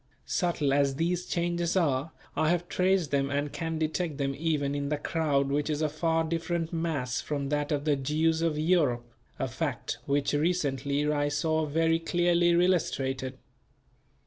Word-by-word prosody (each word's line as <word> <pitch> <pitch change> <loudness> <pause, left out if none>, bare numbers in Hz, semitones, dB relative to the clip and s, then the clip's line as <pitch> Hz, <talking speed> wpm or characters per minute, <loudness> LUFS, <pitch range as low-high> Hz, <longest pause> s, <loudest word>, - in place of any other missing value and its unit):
Subtle 160 -6 0
as 140 -1 +2
these 175 +4 -1
changes 175 +1 0
are 145 -3 +1 0.2
I 155 - +2
have 175 0 0
traced 185 -5 +1
them 140 -1 +1
and 145 0 -1
can 165 -1 -3
detect 155 0 -1
them 135 -1 -1
even 150 -2 0
in 140 0 -2
the 150 - 0
crowd 145 -3 0
which 145 +2 0
is 150 -1 0
a 155 - +2
far 165 +2 +1
different 165 +1 -2
mass 155 -7 -1
from 140 -2 -3
that 145 0 -1
of 145 0 -1
the 150 -2 +3
Jews 155 +4 +1
of 165 -2 +1
Europe, 150 -7 +2 0.3
a - - -1
fact - - -3
which 140 0 +1
recently 145 -3 0
I 145 0 +1
saw 155 +2 0
very 165 +2 +2
clearly 175 +1 +2
illustrated. 135 -7 +1
155 Hz, 165 wpm, -28 LUFS, 140-165 Hz, 0.3 s, the